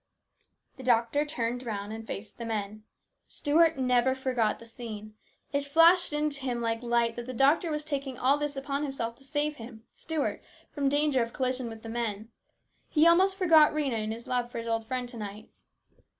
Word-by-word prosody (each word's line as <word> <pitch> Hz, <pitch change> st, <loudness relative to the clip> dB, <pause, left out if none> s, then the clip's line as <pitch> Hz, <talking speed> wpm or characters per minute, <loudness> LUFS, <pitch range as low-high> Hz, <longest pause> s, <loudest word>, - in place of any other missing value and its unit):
The 260 Hz, -, -9 dB
doctor 240 Hz, +4 st, +2 dB
turned 245 Hz, -4 st, -2 dB
round 210 Hz, -3 st, -4 dB
and 225 Hz, 0 st, -8 dB
faced 210 Hz, +4 st, -7 dB
the -, -, -4 dB
men. 215 Hz, -1 st, -4 dB, 0.4 s
Stuart 325 Hz, +1 st, +3 dB
never 255 Hz, 0 st, +2 dB
forgot 250 Hz, -5 st, 0 dB
the 230 Hz, -, -13 dB
scene. 220 Hz, -2 st, -8 dB, 0.4 s
It 280 Hz, 0 st, +1 dB
flashed 330 Hz, +5 st, +5 dB
into 295 Hz, -1 st, -1 dB
him 250 Hz, -2 st, -2 dB
like 230 Hz, -1 st, -1 dB
light 235 Hz, -1 st, +1 dB
that 240 Hz, 0 st, -5 dB
the 255 Hz, -, -4 dB
doctor 285 Hz, +7 st, +3 dB
was 300 Hz, -1 st, -2 dB
taking 275 Hz, -4 st, -3 dB
all 270 Hz, +3 st, +3 dB
this 295 Hz, -1 st, -2 dB
upon 275 Hz, +1 st, -2 dB
himself 255 Hz, -5 st, -3 dB
to 270 Hz, -, -10 dB
save 295 Hz, +2 st, -1 dB
him, 225 Hz, -1 st, -10 dB
Stuart, 320 Hz, -3 st, -2 dB, 0.3 s
from 280 Hz, -2 st, 0 dB
danger 290 Hz, -2 st, +2 dB
of 230 Hz, 0 st, -3 dB
collision 255 Hz, -2 st, -1 dB
with 225 Hz, -1 st, -10 dB
the 225 Hz, -, -7 dB
men. 225 Hz, -2 st, -3 dB, 0.6 s
He 310 Hz, 0 st, +4 dB
almost 370 Hz, +3 st, +5 dB
forgot 325 Hz, -6 st, +6 dB
Rhena 270 Hz, -7 st, 0 dB
in 215 Hz, -, -3 dB
his 230 Hz, +1 st, -7 dB
love 245 Hz, -1 st, -1 dB
for -, -, -6 dB
his 230 Hz, -, -4 dB
old 225 Hz, -1 st, -1 dB
friend 250 Hz, 0 st, -2 dB
to 240 Hz, -1 st, -9 dB
night. 210 Hz, 0 st, -7 dB
255 Hz, 195 wpm, -29 LUFS, 230-290 Hz, 0.6 s, forgot